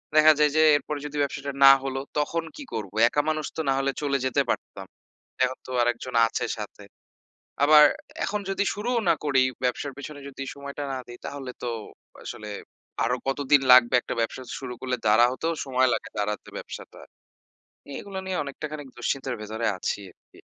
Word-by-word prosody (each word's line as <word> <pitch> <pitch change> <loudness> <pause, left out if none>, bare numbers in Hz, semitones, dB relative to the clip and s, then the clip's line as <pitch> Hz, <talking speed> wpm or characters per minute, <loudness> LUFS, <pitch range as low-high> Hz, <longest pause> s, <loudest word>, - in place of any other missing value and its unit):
দেখা 155 0 +8
যায় 150 -1 +4
যে - - +6 0.2
এরপরে 145 0 -5
যদি 150 0 -5
ব্যবসাটা 140 0 -2
না 135 - +12
হল 135 -1 -3 0.2
তখন 165 +3 -1
কী 295 - -7
করব? 105 -4 -4 0.2
একা 145 - +1
মানুষ 155 -1 -1
তো - - 0
না - - +4
হলে 135 0 +1
চলে 140 -2 +1
যেতে 130 - +2
পারতাম। - - -4 0.6
এখন 130 +1 -4
তো - - -7
আরেকজন 120 +1 -1
আছে - - -2
সাথে। - - -8 0.8
আবার 150 0 +8 0.4
এখন 210 - -1
যদি 195 +1 0
শুরুও 235 +4 -1
না 170 - +6
করি, 135 -3 +4 0.2
ব্যবসার 125 +3 -1
পিছনে 145 0 -8
যদি 135 0 -7
সময়টা 140 +1 -7
না 130 - -3
দেই 120 0 -10
তাহলে 135 -2 -6
তো 125 - -2 0.6
আসলে 105 -1 -7 0.5
আরো 125 +2 +1
কতদিন 140 +1 +3
লাগবে 125 -1 +7
একটা - - -5
ব্যবসা 115 +3 -2 0.2
শুরু 125 -2 -6
করলে? 130 -1 -1
দাঁড়া 110 +3 +6
হতেও 160 +6 -2
সময় 130 -1 +3
লাগে - - -4
দাঁড়াতে 105 0 -2
ব্যবসাটা। - - -9 1.0
এগুলো 195 -2 -6
নিয়ে 185 -4 -1
অনেকটাখানিক 145 +1 -6
দুশ্চিন্তের 130 +1 -2
ভেতরে 110 +2 -4
আছি 90 - -2
আরকি। - - -23
135 Hz, 170 wpm, -26 LUFS, 125-150 Hz, 1.0 s, না